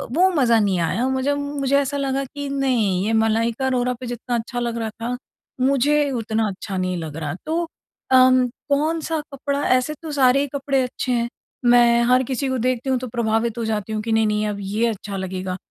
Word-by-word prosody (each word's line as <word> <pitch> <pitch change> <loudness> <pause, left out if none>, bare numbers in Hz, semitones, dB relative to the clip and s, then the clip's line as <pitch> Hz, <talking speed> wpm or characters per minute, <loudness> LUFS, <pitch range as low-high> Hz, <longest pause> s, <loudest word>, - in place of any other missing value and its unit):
वो 370 +2 +5
मज़ा 235 -6 +4
नहीं 195 -4 +1
आया 235 +9 0
मुझे 265 +2 0
मुझे 285 -1 -1
ऐसा 280 0 -1
लगा 275 -1 -1
कि 285 +2 -6
नहीं 235 -9 +1
ये 225 - 0
मलाइका 225 +3 +1
अरोरा 250 -1 +1
पे 255 - -7
जितना 240 +1 -3
अच्छा 240 +1 -3
लग 235 -1 -2
रहा 225 -1 -2
था, 230 +3 -4 0.4
मुझे 280 +2 +3
उतना 225 -2 -1
अच्छा 190 0 -5
नहीं 185 0 -1
लग 160 -3 -6
रहा। 150 -3 -3
तो 335 +2 -1 0.4
अम 255 0 +6 0.2
कौन-सा 315 +2 0
कपड़ा 280 +1 -2
ऐसे 280 +4 -2
तो 315 - -5
सारे 270 -2 +4
ही 285 - -1
कपड़े 275 -1 +1
अच्छे 250 0 -3
हैं 235 -1 0 0.4
मैं 240 -1 +5
हर 255 +1 +5
किसी 270 +1 -1
को 260 - 0
देखती 255 +2 -1
हूँ 260 - +2
तो 255 - -5
प्रभावित 225 0 0
हो 230 - -2
जाती 215 -1 -2
हूँ 215 - -1
कि 225 - -3
नहीं-नहीं 215 -1 +2
अब 205 -1 -3
ये 210 +4 0
अच्छा 200 -2 -4
लगेगा। 185 -1 -4
245 Hz, 200 wpm, -22 LUFS, 220-275 Hz, 0.4 s, अम